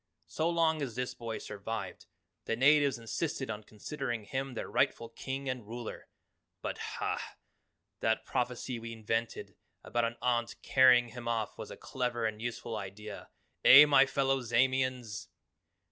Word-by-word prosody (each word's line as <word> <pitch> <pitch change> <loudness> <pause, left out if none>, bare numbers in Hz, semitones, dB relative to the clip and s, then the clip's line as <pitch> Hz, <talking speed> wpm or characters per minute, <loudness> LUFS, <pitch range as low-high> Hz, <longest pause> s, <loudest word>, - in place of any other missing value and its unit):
So 160 +2 -1
long 165 -2 +2
as 125 -5 -3
this 125 0 -2
boy 115 -2 -5
survived, 105 +2 -6 0.4
the - - 0
natives 140 +2 +4
insisted 130 +2 -3
on 105 0 -6
considering 120 +2 -5
him 130 +4 -4
their - - -4
rightful 115 - +1
King 135 +4 -5
and 125 -2 -3
Ruler. 120 0 -7 0.6
But, - - -3 0.2
hah! - - -1 0.8
that - - +1
prophecy 125 0 -2
we 115 0 -7
invented 115 +1 -3 0.3
about 120 -1 0
an 115 +1 -3
aunt 120 -1 0
carrying 125 -2 +6
him 120 0 -8
off 115 -2 -1
was - - -8
a - - -9
clever 120 -3 -2
and 110 0 -2
useful 120 -1 -4
idea 100 +1 -8 0.3
eh, 145 +3 +11
my 140 -2 +6
fellow 135 -1 +1
Zamians? 125 -2 0
120 Hz, 145 wpm, -32 LUFS, 115-130 Hz, 0.8 s, eh